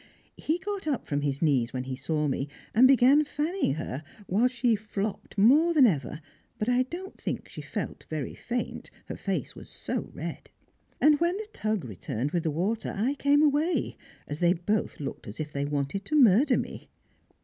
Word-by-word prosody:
He 320 - 0
got 395 -2 -5
up 280 -5 -1
from 145 0 -1
his 140 +1 -1
knees 130 -7 +2
when 125 -1 -2
he 130 0 -4
saw 150 +3 -1
me, 135 0 -1 0.3
and 245 +4 +7
began 270 +3 +6
fanning 305 - -1
her, 150 -3 -4 0.2
while 210 +7 +3
she 245 -2 +1
flopped 210 -1 -5
more 295 +11 +5
than 280 -4 +7
ever, 150 - 0 0.4
but 215 - -2
I 245 0 +3
don't 345 +9 -6
think - - -3
she - - -8
felt - - -5
very 155 -4 -3
faint, 240 0 -4 0.2
her - - -6
face - - -3
was - - -11
so - - -4
red. - - -6 0.5
And 300 -1 +5
when 345 +3 +1
"the 430 - -5
Tug" 215 -7 -1
returned 115 +5 -4
with 175 - 0
the 160 - -1
water 190 +9 -1
I 240 +7 +1
came 285 +1 +3
away, 305 +4 +1 0.3
as 145 +1 -5
they 175 0 +4
both 205 +5 -1
looked 140 -2 -6
as 105 - -8
if 150 -1 -4
they 140 0 -1
wanted 145 +7 -2
to 305 - -1
murder 250 0 +6
me. - - -5
215 Hz, 190 wpm, -28 LUFS, -, 0.5 s, and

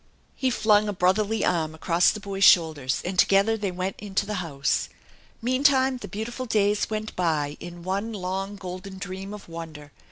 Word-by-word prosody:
He 260 - 0
filing 215 -3 +3
a - - -1
brotherly 200 +4 +1
arm 160 -3 0
across 170 +2 +3
the 215 - -2
boy's 195 -1 -3
shoulders 155 -8 +4
and 180 0 -2
together 200 +3 +4
they 205 -3 -2
went 185 +1 -3
into 200 -1 -2
the 210 - -4
house. 140 -5 -1 0.5
Meantime 260 +1 +3
the - - -8
beautiful 240 +5 -5
days 210 -2 +1
went 215 0 -4
by 155 -5 0
in 175 0 -9
one 200 +5 -2
long, 195 0 -3
golden 185 0 -8
dream 195 0 -6
of 210 -1 -9
wonder. 160 -3 -9
195 Hz, 170 wpm, -25 LUFS, 175-215 Hz, 0.5 s, shoulders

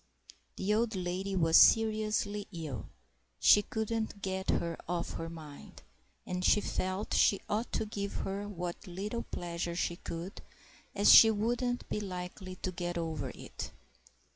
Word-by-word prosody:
The 200 +2 0
old 225 0 +1
lady 185 +2 -2
was 165 -3 +5
seriously 215 -2 +4
ill; 155 - -6 0.5
she 205 - +7
couldn't 220 -1 -3
get 190 0 -3
her 170 -1 0
off 175 -1 -2
her 165 - -5
mind; 155 -3 -11 0.4
and 180 0 -3
she 210 - +5
felt 185 0 -2
she 200 - +4
ought 220 +3 -2
to 220 - 0
give 200 -1 -4
her 200 +1 -3
what 175 0 -5
little 205 +6 -4
pleasure 170 0 -4
she 170 0 -1
could, 170 +4 -7 0.5
as 205 0 +7
she 225 - +10
wouldn't 240 +3 -1
be - - -2
likely 185 -1 -6
to 185 - -1
get 175 -1 -4
over 160 -5 -3
it. - - -7
190 Hz, 145 wpm, -32 LUFS, 175-210 Hz, 0.5 s, she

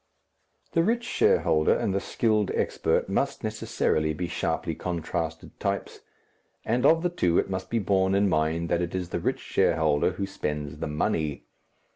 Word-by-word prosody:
The 165 - +3
rich 235 +7 +1
shareholder 80 - +3
and 95 - -1
the 100 - +1
skilled 110 -1 +1
expert - - 0
must - - -1
necessarily 75 0 0
be 90 +2 -3
sharply 85 0 -2
contrasted 80 -1 -4
types, - - -3 0.7
and 125 +4 +2
of 165 +1 +4
the 180 - +2
two 90 - +1
it - - +1
must 95 0 -4
be 115 - 0
borne 95 -2 +2
in 100 +1 +3
mind 80 0 +1
that 85 - +1
it 85 +1 -3
is 90 -2 -3
the - - -2
rich - - -1
shareholder 80 +1 +2
who 100 +2 -3
spends 75 -6 -4
the - - -2
money. 75 0 -1
90 Hz, 165 wpm, -27 LUFS, 80-100 Hz, 0.7 s, of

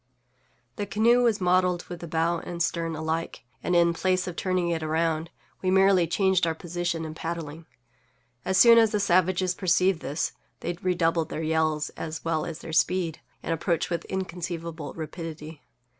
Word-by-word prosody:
The 205 - -3
canoe 230 +4 +4
was 230 -3 +2
modelled 180 -1 +2
with 175 -1 -8
the 170 - -7
bow 165 +1 0
and 170 0 -3
stern 165 -1 -2
alike, 160 +1 -3 0.2
and, 180 - 0
in 170 0 +4
place 185 +1 0
of 180 - -5
turning 185 -2 0
it 165 -1 -1
around, 160 +1 0 0.3
we 185 - 0
merely 190 -2 +4
changed 190 0 +2
our 160 - -1
position 175 0 -3
in 155 - -6
paddling. 160 -1 -6 0.8
As 190 - 0
soon 230 -1 +8
as 225 -1 +5
the 210 - +2
savages 185 -1 +2
perceived 185 -1 +2
this 150 +1 -2 0.3
they 175 - -2
redoubled 165 -3 +1
their 160 - -4
yells, 155 -1 0
as 160 0 -6
well 160 -1 0
as 165 -2 -7
their 160 - -8
speed, 170 -1 +1 0.2
and 165 - -1
approached 165 +1 -1
with 170 -1 -2
inconceivable 170 -4 -5
rapidity. 160 -1 -7
170 Hz, 170 wpm, -26 LUFS, 160-185 Hz, 0.8 s, soon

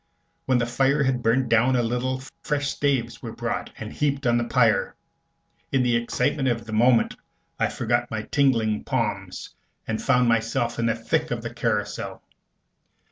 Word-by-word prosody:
When 130 -1 +3
the 120 - +1
fire 135 +4 +2
had 130 -2 0
burnt 120 +3 +2
down 120 +3 +3
a 120 - +2
little, 130 +3 -2 0.2
fresh 145 -1 -1
staves 140 -4 -1
were - - -6
brought - - -3
and - - -7
heaped 140 -2 -1
on 120 -1 +3
the - - 0
pyre. 115 -4 +2 0.8
In 135 -2 +2
the 120 -1 +2
excitement 135 +4 0
of 115 -3 -1
the 110 - -7
moment 120 +2 +3 0.4
I - - +3
forgot 120 +1 -1
my 110 -1 -3
tingling 115 -7 +1
palms, 105 -7 -3 0.4
and 110 0 -2
found 125 -3 +3
myself 115 +1 0
in 115 - +1
the 115 - +1
thick 115 -1 -1
of - - -3
the - - -5
carousal. - - -2
120 Hz, 170 wpm, -24 LUFS, 115-130 Hz, 0.8 s, When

